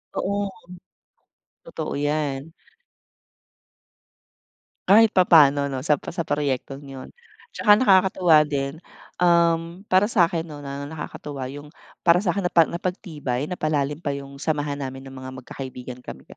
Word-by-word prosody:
Oo, 200 0 -1 1.2
totoo - - -5
yan. 145 0 -2 2.4
Kahit 220 +3 +7
papaano 145 -6 +5
'no, 135 -1 -4
sa 150 -2 +2
pro - - -8
sa 170 - -1
proyektong 140 -2 -2
yun 135 -1 -10 0.4
tsaka 210 -2 +5
nakakatuwa 185 -7 +5
din, 140 0 -3 0.4
um, 170 0 +2
para 185 +2 +4
sa'kin 170 -6 +1
'no 145 -2 -9
na 140 0 -6
nakakatuwa 145 -3 -7
yung 145 +1 -9 0.4
para 170 +1 +6
sa'kin 195 +1 0
napa 170 -1 +5
napagtibay, 160 - -4
napalalim 150 -3 -1
pa 145 -4 -3
yung 140 0 -9
samahan 145 -1 -2
namin 135 -1 -6
ng 135 - -11
mga 130 0 -8
magkakaibigan 125 -2 -8
kami 65 - -10
150 Hz, 125 wpm, -23 LUFS, 140-175 Hz, 2.4 s, Kahit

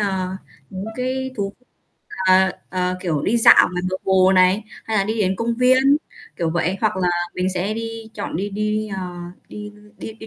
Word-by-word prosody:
ờ, 190 -2 -1 0.3
những 190 +1 -6
cái 260 +1 -2
thú, 200 -2 -2 0.8
ờ, 190 0 +5 0.2
ờ, 180 0 -1
kiểu, 160 -6 -1
đi 230 - +1
dạo 225 - +7
ngoài 180 0 -3
bờ 185 - -1
hồ 190 0 +4
này, 185 +3 +4 0.2
hay 220 -1 -1
là 195 - +2
đi 220 +2 -2
đến 190 -1 +1
công 230 +3 -1
viên, 260 +3 +4 0.4
kiểu 165 -3 -1
vậy, 175 +3 0
hoặc 215 -4 +1
là 180 -1 +1 0.3
mình 185 0 -1
sẽ 195 +4 -1
đi 225 0 -6
chọn 205 - -4
đi 200 +4 -3
đi, 215 +1 -1
ờ, 190 - -4 0.5
đi 210 0 -8 0.3
đi 220 - -7
đi 220 0 -12
200 Hz, 195 wpm, -21 LUFS, 185-225 Hz, 0.8 s, dạo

